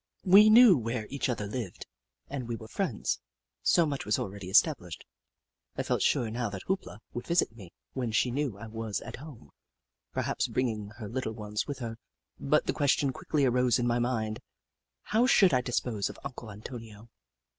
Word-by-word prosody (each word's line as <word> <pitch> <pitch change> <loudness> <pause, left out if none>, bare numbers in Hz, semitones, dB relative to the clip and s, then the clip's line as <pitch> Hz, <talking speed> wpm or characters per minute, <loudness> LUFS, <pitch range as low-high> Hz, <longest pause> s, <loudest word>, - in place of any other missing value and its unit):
We 200 +3 +8
knew 220 - +8
where 115 -1 -3
each 140 -1 -1
other 115 -4 -2
lived, 105 -2 -5 0.4
and 135 -4 -5
we 120 - -2
were 110 -1 -9
friends - - -2 0.2
— - - -60
so 170 - +5
much 140 -3 -3
was 105 - +1
already 100 -1 -5
established. 95 - +2 0.7
I - - 0
felt - - 0
sure 115 -2 +2
now 120 -1 -2
that 95 -2 -7
Hoop 190 0 -1
La - - -10 0.2
would 120 - -6
visit 170 -9 +1
me 95 -7 -12 0.2
when 125 -4 -2
she 120 +3 +2
knew 135 -5 -2
I 110 - -8
was 110 -1 -4
at - - -8
home, 130 - -12 0.6
perhaps - - -1
bring 130 -1 0
ing 105 -2 -5
her 110 -4 -6
little 120 0 -3
ones 105 -1 -4
with 145 -2 -4
her, 115 -3 -5 0.4
but 150 +2 +2
the - - 0
question 140 -1 +2
quickly 145 +1 0
arose 125 0 +3
in 120 - 0
my 120 0 +2
mind: 110 -3 -1 0.6
how 230 +4 +2
should 195 - +5
I 125 - +4
dis 125 -1 0
pose 110 -5 -2
of - - -9
Uncle 125 -4 -7
Antonio 110 +1 -10
120 Hz, 195 wpm, -29 LUFS, 110-140 Hz, 0.7 s, We